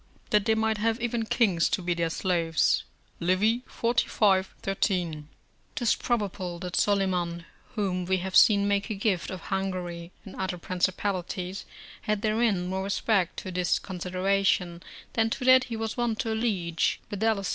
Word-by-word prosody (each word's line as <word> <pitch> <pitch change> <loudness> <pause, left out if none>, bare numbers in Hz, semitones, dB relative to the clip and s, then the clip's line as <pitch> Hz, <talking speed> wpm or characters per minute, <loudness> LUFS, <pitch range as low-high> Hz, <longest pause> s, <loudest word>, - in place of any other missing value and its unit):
["That 210 -1 +3
they 220 -1 +3
might 220 -1 0
have 225 +2 +1
even 235 -1 -1
kings 190 -10 +2
to - - 0
be 175 -1 -1
their 170 -1 -1
slaves." 165 -2 +1 0.3
Livy, 195 +7 +2
xlv. 210 -5 +2 0.2
13.] 175 -6 -1 0.5
'Tis 240 -7 +2
probable 200 -6 -2
that 180 0 -5
Solyman, 180 -4 +1 0.3
whom 185 -4 -1
we 190 +1 +1
have 185 +1 -4
seen 200 -2 +6
make 200 0 0
a 215 - -2
gift 195 -4 0
of 185 -2 -6
Hungary 180 -3 -3
and 195 - -10
other 190 -1 -2
principalities, 185 +1 -2 0.4
had 215 -1 -1
therein 215 -4 +1
more 190 +1 -2
respect 200 -2 0
to 185 - -5
this 180 -1 +1
consideration 185 -1 0 0.3
than 225 -1 +2
to 250 +2 -3
that 255 0 +7
he 235 - -5
was 225 +1 -4
wont 240 -2 0
to 225 - -2
allege, 190 -8 0
viz. 205 -1 0
195 Hz, 155 wpm, -27 LUFS, 180-220 Hz, 0.5 s, that